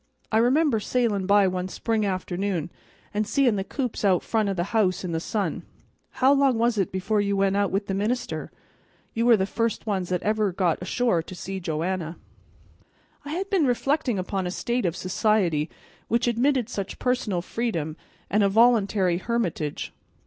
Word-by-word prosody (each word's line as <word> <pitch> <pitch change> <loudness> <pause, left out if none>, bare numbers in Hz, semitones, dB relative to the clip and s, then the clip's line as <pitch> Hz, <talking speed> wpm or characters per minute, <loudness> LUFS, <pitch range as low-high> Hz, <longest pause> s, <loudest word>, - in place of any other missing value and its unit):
I 220 - +4
remember 255 +1 +3
sailin' 210 -4 0
by 200 -1 +5
one 185 0 -2
spring 215 +2 -1
afternoon, 185 -2 -2 0.4
an' 210 +1 0
seein' 250 -1 +2
the 195 - -1
coops 250 +3 -4
out 190 -3 +3
front 220 -3 0
o' - - 0
the 175 - 0
house 195 -5 +2
in 180 - -3
the 165 - -1
sun. 205 +4 -2 0.5
How 265 +2 +4
long 275 -3 +3
was 230 -1 +2
it 195 - 0
before 195 +3 0
you 200 -1 0
went 195 0 +2
out 200 -1 +2
with 200 +1 -1
the 195 - -3
minister? 225 +5 -2 0.6
You 230 +1 +1
were 235 -2 +7
the 190 - +1
first 230 +2 -2
ones 190 -5 -1
that 180 -1 -1
ever 215 0 +1
really 190 -3 -2
got 175 -4 +1
ashore 210 -1 +1
to 185 - -10
see 190 +2 -5
Joanna." 170 0 -3 1.1
I 290 - -5
had 385 +4 -3
been 355 -8 +3
reflecting 260 -1 +1
upon 185 0 -2
a - - -2
state 240 +3 -1
of 165 - -2
society 185 -5 +1 0.4
which 235 +2 +1
admitted 245 +1 +2
such 200 -5 -5
personal 225 -8 -1
freedom 170 -10 -2 0.3
and 210 - +2
a 200 - +4
voluntary 200 -5 +3
hermitage. 185 -10 -2
205 Hz, 180 wpm, -25 LUFS, 185-235 Hz, 1.1 s, were